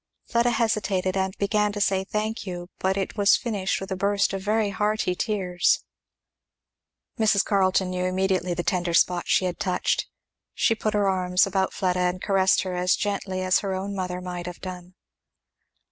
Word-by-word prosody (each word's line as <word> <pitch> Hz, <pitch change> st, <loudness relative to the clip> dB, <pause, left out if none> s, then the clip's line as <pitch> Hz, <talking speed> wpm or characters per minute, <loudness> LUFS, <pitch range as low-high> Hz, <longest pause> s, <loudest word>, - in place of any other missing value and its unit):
Fleda 235 Hz, +1 st, +2 dB
hesitated 210 Hz, -5 st, 0 dB
and 190 Hz, 0 st, -1 dB
began 210 Hz, +1 st, +1 dB
to 205 Hz, -, -4 dB
say, 190 Hz, -1 st, +1 dB
"Thank 215 Hz, +3 st, -3 dB
you," 175 Hz, -1 st, -6 dB
but 190 Hz, +1 st, 0 dB
it 195 Hz, +2 st, -3 dB
was 200 Hz, -1 st, +5 dB
finished 205 Hz, -6 st, -2 dB
with 195 Hz, +1 st, -7 dB
a -, -, 0 dB
burst 200 Hz, +1 st, +1 dB
of 195 Hz, -, -3 dB
very 210 Hz, +1 st, +1 dB
hearty 210 Hz, -2 st, 0 dB
tears. 180 Hz, -3 st, 0 dB, 1.4 s
Mrs. 210 Hz, -3 st, +3 dB
Carleton 190 Hz, -2 st, +2 dB
knew 180 Hz, 0 st, -2 dB
immediately 185 Hz, -1 st, 0 dB
the 175 Hz, -, -2 dB
tender 175 Hz, -2 st, 0 dB
spot 175 Hz, 0 st, +3 dB
she 185 Hz, -, +3 dB
had 180 Hz, -1 st, -3 dB
touched. 180 Hz, -2 st, 0 dB, 0.5 s
She -, -, +3 dB
put 215 Hz, -1 st, -2 dB
her 205 Hz, -1 st, +2 dB
arms 185 Hz, -1 st, +2 dB
about 190 Hz, -1 st, 0 dB
Fleda 180 Hz, -2 st, -1 dB
and 180 Hz, 0 st, 0 dB
caressed 195 Hz, 0 st, +2 dB
her 185 Hz, -1 st, -4 dB
as 180 Hz, 0 st, +2 dB
gently 195 Hz, -2 st, -2 dB
as 185 Hz, 0 st, +3 dB
her 195 Hz, -2 st, -3 dB
own 195 Hz, +2 st, -4 dB
mother 180 Hz, -1 st, -3 dB
might 180 Hz, -1 st, -6 dB
have 180 Hz, -, -7 dB
done. 180 Hz, -1 st, -8 dB
190 Hz, 175 wpm, -25 LUFS, 180-205 Hz, 1.4 s, was